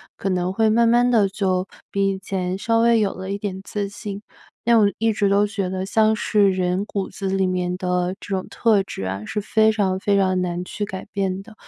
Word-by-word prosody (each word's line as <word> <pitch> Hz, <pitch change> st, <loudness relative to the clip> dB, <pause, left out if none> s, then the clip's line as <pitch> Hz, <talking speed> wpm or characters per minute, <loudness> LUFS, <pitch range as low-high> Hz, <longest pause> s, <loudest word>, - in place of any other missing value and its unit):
可 195 Hz, -, -3 dB
能 180 Hz, 0 st, 0 dB
会 220 Hz, +2 st, +2 dB
慢 230 Hz, +2 st, +4 dB
慢 240 Hz, +1 st, +4 dB
的 220 Hz, -5 st, +4 dB
就 190 Hz, -1 st, -1 dB, 0.2 s
比 195 Hz, 0 st, +1 dB
以 190 Hz, -, -4 dB
前 185 Hz, -1 st, -3 dB
稍 230 Hz, +2 st, +1 dB
微 230 Hz, 0 st, +4 dB
有 205 Hz, -3 st, +1 dB
了 190 Hz, +1 st, -6 dB
一 200 Hz, -, -3 dB
点 195 Hz, -2 st, -4 dB
自 200 Hz, -1 st, -3 dB
信。 205 Hz, -1 st, -7 dB, 0.4 s
但 235 Hz, 0 st, +5 dB
我 205 Hz, -1 st, +5 dB
一 225 Hz, +1 st, +2 dB
直 205 Hz, -1 st, +1 dB
都 200 Hz, +1 st, +3 dB
觉 205 Hz, -2 st, -3 dB
得 185 Hz, +1 st, -3 dB
像 220 Hz, +2 st, +3 dB
是 205 Hz, -1 st, +2 dB
人 185 Hz, +1 st, 0 dB
骨 200 Hz, -2 st, -3 dB
子 195 Hz, -, -5 dB
里 190 Hz, 0 st, +1 dB
面 180 Hz, -1 st, -1 dB
的 180 Hz, 0 st, -1 dB
这 -, -, -10 dB
种 190 Hz, -2 st, -2 dB
特 220 Hz, -4 st, +2 dB
质 95 Hz, -, -6 dB, 0.2 s
是 210 Hz, -, -3 dB
非 220 Hz, +1 st, +3 dB
常 190 Hz, -3 st, 0 dB
非 200 Hz, +1 st, +1 dB
常 185 Hz, -1 st, +2 dB
难 175 Hz, 0 st, -2 dB
去 205 Hz, +3 st, -4 dB
改 190 Hz, -1 st, -7 dB
变 195 Hz, -1 st, -2 dB
的， 220 Hz, +2 st, -14 dB
195 Hz, 240 characters per minute, -22 LUFS, 185-215 Hz, 0.4 s, 但